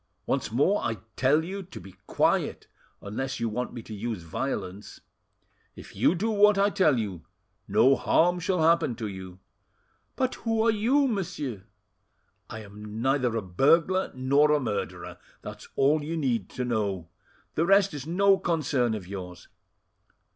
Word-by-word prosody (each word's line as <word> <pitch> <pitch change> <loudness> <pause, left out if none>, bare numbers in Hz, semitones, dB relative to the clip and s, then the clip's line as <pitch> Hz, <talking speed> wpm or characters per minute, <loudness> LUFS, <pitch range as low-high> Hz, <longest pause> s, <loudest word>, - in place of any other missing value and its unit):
Once - - -1
more 145 - +2
I 115 - -1 0.2
tell 145 +4 +3
you 195 +3 -5
to 185 - -10
be 95 +2 -12 0.2
quiet, - - 0 0.4
unless 135 +7 -4
you 115 - 0
want 125 +3 -3
me 120 - -8
to 110 - -9
use 110 -3 -4
violence. 95 +1 -5 0.7
If - - -12
you - - +3
do 220 +6 -1
what 210 -1 +5
I 200 +1 +3
tell 155 -10 +3
you, 100 -7 -4 0.4
no 115 +7 +4
harm 175 +5 +2
shall 180 -1 0
happen 165 -6 +3
to 110 -1 -5
you." 95 -3 -7 0.8
"But 260 -1 0
who 225 -1 +1
are 230 - +5
you, 250 +7 +2
monsieur?" 165 - -4 0.8
"I 110 - -7
am 105 +2 -8
neither 130 -4 +1
a 110 - -2
burglar 165 - +2
nor 140 +4 +3
a 150 - +3
murderer; 90 - -4 0.2
that's - - -9
all 145 +3 +3
you 165 +3 -3
need 120 - -1
to 125 - -4
know; 100 -8 -2 0.4
the 165 +2 0
rest 195 -1 +4
is 145 -1 -6
no 195 +3 +3
concern 145 - 0
of 95 -4 -7
yours. 90 -2 -8
135 Hz, 160 wpm, -27 LUFS, 105-175 Hz, 0.8 s, what